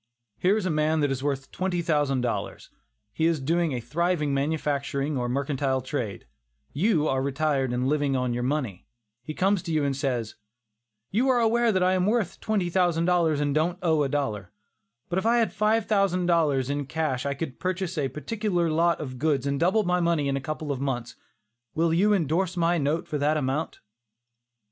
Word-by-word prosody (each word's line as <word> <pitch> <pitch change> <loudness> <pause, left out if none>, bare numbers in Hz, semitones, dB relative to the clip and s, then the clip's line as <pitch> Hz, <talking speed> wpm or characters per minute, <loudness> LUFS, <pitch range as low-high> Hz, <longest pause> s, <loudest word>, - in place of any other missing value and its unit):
Here 195 +4 +3
is 210 - -2
a 185 - 0
man 155 +1 +1
that 145 -1 +1
is 135 0 -3
worth 135 -2 -2
twenty 180 -2 -2
thousand 145 -5 +1
dollars; 120 -2 -4 0.4
he 160 - +1
is 165 -2 +1
doing 165 +4 0
a 125 - -2
thriving 155 +2 0
manufacturing 140 0 -1
or 125 -2 -1
mercantile 135 0 0
trade; 125 -6 -4 0.5
you 160 -1 +2
are 135 0 +1
retired 140 -1 0
and 125 +1 0
living 145 -1 +1
on 125 -1 0
your 120 - -2
money; 125 -8 -2 0.3
he 155 +5 -7
comes 195 0 +2
to 170 - -5
you 155 -2 +1
and 140 -1 0
says: 125 -5 -2 0.8
"You 245 +7 +2
are 250 -2 +4
aware 235 0 +3
that 185 -3 +1
I 185 +1 +3
am 185 0 +1
worth 215 -5 0
twenty 210 -5 0
thousand 175 -2 +2
dollars, 170 -4 +2
and 145 -1 0
don't 165 +4 +1
owe 160 -3 +3
a 140 - +1
dollar; 110 -10 -2 0.6
if 185 +2 0
I 230 +2 +3
had 230 -2 +1
five 215 +1 +2
thousand 195 -4 +1
dollars 155 -7 +2
in 145 -1 -2
cash, 150 -5 -1
I 140 0 -2
could 140 -3 -6
purchase 185 -1 -2
a 145 -4 -1
particular 175 0 -1
lot 170 +2 +2
of 130 -4 -6
goods 145 -3 +1
and 140 0 -1
double 190 +6 +3
my 180 -1 +1
money 170 -4 +1
in 135 - 0
a 135 - -2
couple 155 +1 -4
of 135 -2 -3
months; 125 -4 -3 0.6
will 165 0 +2
you 200 +5 +3
indorse 180 0 +1
my 170 0 +2
note 150 +3 -1
for 150 - -3
that 150 +2 +2
amount?" 145 +2 -2
155 Hz, 195 wpm, -26 LUFS, 140-180 Hz, 0.8 s, are